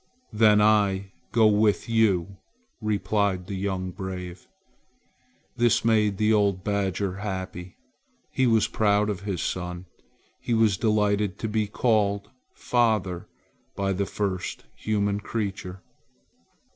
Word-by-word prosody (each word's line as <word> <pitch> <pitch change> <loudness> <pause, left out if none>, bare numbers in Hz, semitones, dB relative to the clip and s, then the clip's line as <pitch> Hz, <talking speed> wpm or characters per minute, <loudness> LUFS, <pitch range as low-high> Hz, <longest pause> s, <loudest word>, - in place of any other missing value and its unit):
"Then 105 -1 +5
I 100 -2 +2 0.2
go 115 -2 +4
with 105 0 +3
you," 100 -5 +1 0.4
replied 100 -3 0
the 100 - -6
young 95 -1 -3
brave. 90 -2 -7 1.1
This 115 -2 +2
made 105 -3 +3
the 110 +1 +3
old 100 -3 +2
badger 100 -2 -1
happy. 95 -3 -6 0.5
He 130 - +2
was 115 -3 +3
proud 105 0 +2
of 100 - -5
his 100 -3 -3
son. 90 0 -4 0.5
He 120 - -1
was 110 -3 +3
delighted 105 -2 +1
to 110 - -3
be 105 -1 0
called 100 -2 0 0.2
"father" 110 -7 0 0.5
by 95 0 0
the 100 +1 -1
first 95 -9 -3
human 100 -1 -1
creature. 95 -4 -5
100 Hz, 120 wpm, -25 LUFS, 95-110 Hz, 1.1 s, Then